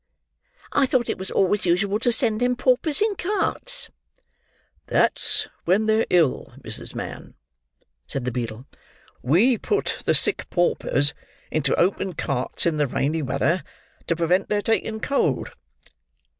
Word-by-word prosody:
I 275 -2 +3
thought 255 -2 +1
it - - -6
was 190 - -4
always 195 0 +1
usual 195 +4 +1
to 240 +1 +2
send 225 -3 +1
them 250 0 +2
paupers 270 +7 +1
in 430 -1 +2
carts." 425 +6 0 1.0
"That's - - +1 0.2
when 195 +5 +3
they're 220 +1 +2
ill, 165 -7 +2
Mrs. - - -1
Mann," - - -7 0.7
said 135 -3 -4
the 125 - -1
beadle. 115 0 -5 0.6
"We 205 - +3
put 415 -1 -1
the - - +3
sick - - +1
paupers 145 -4 +1 0.4
into 145 -3 +1
open 190 +1 +1
carts 135 -5 -2
in 165 -2 +1
the 145 -1 +1
rainy 150 +5 -1
weather, 140 +5 0 0.4
to 170 - +1
prevent 170 +3 +1
their 205 -1 0
taking 220 -1 0
cold." 280 +11 0
190 Hz, 140 wpm, -23 LUFS, 150-240 Hz, 1.0 s, I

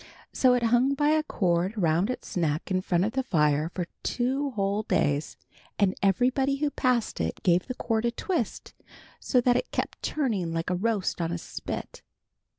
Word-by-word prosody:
So 255 -1 +4
it 245 - 0
hung 245 +4 +3
by 295 +1 +2
a 310 0 +3
cord 185 - 0
around 170 +2 +2
its 255 - -5
neck 160 +1 -1
in 185 0 +1
front 180 0 +1
of 220 - -1
the 265 - 0
fire 150 - +1
for 175 0 -4 0.2
two 265 +3 -1
whole 200 -3 -1
days, 145 -7 0 0.4
and 195 -3 +3
everybody 255 +8 +2
who 290 +1 -1
passed 250 - 0
it 80 0 -3
gave 180 -1 +3
the 255 - -4
cord 225 -1 -1
a - - +3
twist, 300 - -3 0.5
so 255 - +2
that 245 0 +3
it - - -1
was - - -38
kept - - -2
turning 210 - -1
like 165 +2 -2
a - - +1
roast 200 -2 -1
on 165 0 -1
a 175 - -2
spit. - - -6
215 Hz, 190 wpm, -27 LUFS, 175-255 Hz, 0.5 s, So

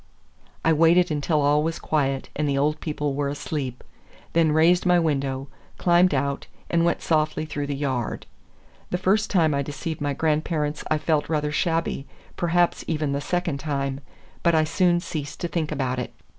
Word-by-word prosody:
I 160 - +5
waited 165 +2 +4
until 150 +1 +1
all 145 +1 +3
was 165 +2 -1
quiet 135 -3 -1
and 150 -1 0
the 140 - +1
old 150 +2 +1
people 150 -2 -2
were 140 0 -1
asleep, 140 -3 -4 0.5
then 165 -2 +4
raised 165 +3 +4
my 180 -1 +4
window, 140 -4 0 0.3
climbed 175 -2 +4
out, 140 +1 -1 0.2
and 170 -1 +3
went 170 0 +1
softly 155 -1 +1
through 145 -2 -4
the 140 - -2
yard. 130 -5 -2 0.6
The 180 - 0
first 210 +4 +2
time 165 -6 +3
I 140 - +1
deceived 145 +3 -5
my 145 -1 0
grandparents 155 0 -1
I 155 - +3
felt 155 -1 0
rather 150 -2 0
shabby, 165 -3 -1 0.3
perhaps 175 0 +1
even 155 -3 -1
the 140 0 -1
second 170 -2 -1
time, 140 -2 -2 0.4
but 170 -1 +3
I 155 - +4
soon 175 +2 +2
ceased 150 -5 -5
to 175 - 0
think 165 -3 -2
about 130 -3 -1
it. 125 - -4
155 Hz, 175 wpm, -24 LUFS, 140-165 Hz, 0.6 s, I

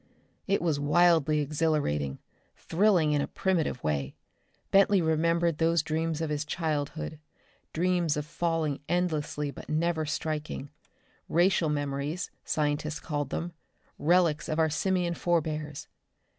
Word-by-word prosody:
It 195 -2 +1
was 160 -4 +1
wildly 155 0 +4
exhilarating, 145 - 0 0.4
thrilling 175 -4 +2
in 145 -1 +2
a - - -2
primitive 170 -9 -1
way. 70 -3 -1 0.6
Bentley 195 0 +5
remembered 165 0 +1
those 165 -1 +3
dreams 160 0 -1
of 160 -2 -2
his 150 0 -1
childhood 155 -1 -3 0.5
dreams 175 -2 +1
of 150 - -2
falling 165 -3 -1
endlessly 155 -4 -1
but - - -11
never 160 0 0
striking. 150 -2 -3 0.6
Racial 175 -1 +3
memories, 145 +3 -2
scientists 150 0 -1
called 145 -4 -3
them, 170 +4 -4 0.5
relics 170 -1 +2
of 155 - -1
our 160 -1 +2
simian 180 +1 0
forebears. 155 -4 -1
155 Hz, 120 wpm, -28 LUFS, 150-170 Hz, 0.6 s, Bentley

